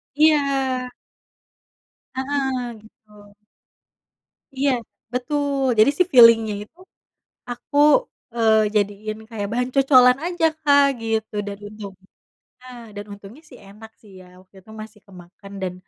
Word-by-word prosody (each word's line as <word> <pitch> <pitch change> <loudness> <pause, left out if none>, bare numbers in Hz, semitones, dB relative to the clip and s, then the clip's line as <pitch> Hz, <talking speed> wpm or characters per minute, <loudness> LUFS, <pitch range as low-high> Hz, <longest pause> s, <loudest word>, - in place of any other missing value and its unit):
Iya. 275 -4 +1 1.2
Heeh, 265 -1 -2 0.2
gitu. 210 -1 -20 1.2
Iya, 275 +1 +1 0.4
betul 275 0 -1
jadi 220 +6 +6
sih 365 - +2
filling-nya 230 -3 +6
itu 340 - -49 0.7
aku, 245 +4 -6 0.6
eee, 220 -2 +3
jadiin 210 +1 -2
kayak 210 -3 -5
bahan 250 +1 -1
cocolan 260 -2 +5
aja, 345 -2 -1 0.2
Kak, 285 -2 +4 0.2
gitu 220 -1 -3
dan 200 0 -6
untung 205 -2 -10 0.7
heeh, 255 -1 -12 0.2
dan 205 0 -7
untungnya 205 +9 -13
sih - - -14
enak 215 +3 -14
sih 210 - -19
ya - - -17
waktu 185 +1 -26
itu 220 - -18
masih 215 0 -14
kemakan 185 +1 -15
dan, 185 - -3
230 Hz, 120 wpm, -21 LUFS, 210-270 Hz, 1.2 s, jadi